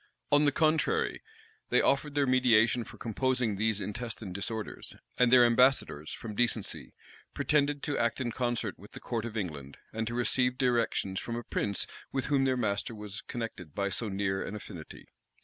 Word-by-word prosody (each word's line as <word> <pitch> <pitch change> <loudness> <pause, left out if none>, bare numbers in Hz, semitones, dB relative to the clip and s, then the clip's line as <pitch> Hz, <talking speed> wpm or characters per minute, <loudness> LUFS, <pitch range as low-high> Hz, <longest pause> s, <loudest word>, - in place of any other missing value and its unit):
On 145 +1 +6
the 145 - +5
contrary, 160 - +1 0.5
they - - +4
offered 140 +1 +2
their 145 -1 +3
mediation 120 -3 +4
for - - -12
composing 125 -1 0
these 110 +1 +1
intestine 105 -1 -5
disorders; 105 +3 -5 0.2
and 125 -1 +5
their 125 -1 +8
ambassadors, 120 - +3
from 110 -2 -6
decency, 115 -2 -1 0.4
pretended 145 -1 +1
to 145 - -1
act 115 +3 +1
in 120 -2 -1
concert 120 -4 -2
with 100 +3 -14
the - - -8
court 115 -2 -3
of 115 -1 -5
England, 75 -8 -5 0.2
and 110 0 -2
to 120 - -3
receive 125 +1 +1
directions 120 -7 +1
from 115 - -4
a 120 - -4
prince 100 -2 -1 0.3
with 135 -1 -1
whom 135 -1 +4
their 130 -1 +2
master 110 0 -1
was 105 -1 -6
connected 100 -10 -6
by 100 0 0
so 110 +2 -2
near 95 -1 -1
an 105 - -5
affinity. 90 -6 -9
115 Hz, 175 wpm, -30 LUFS, 105-130 Hz, 0.5 s, their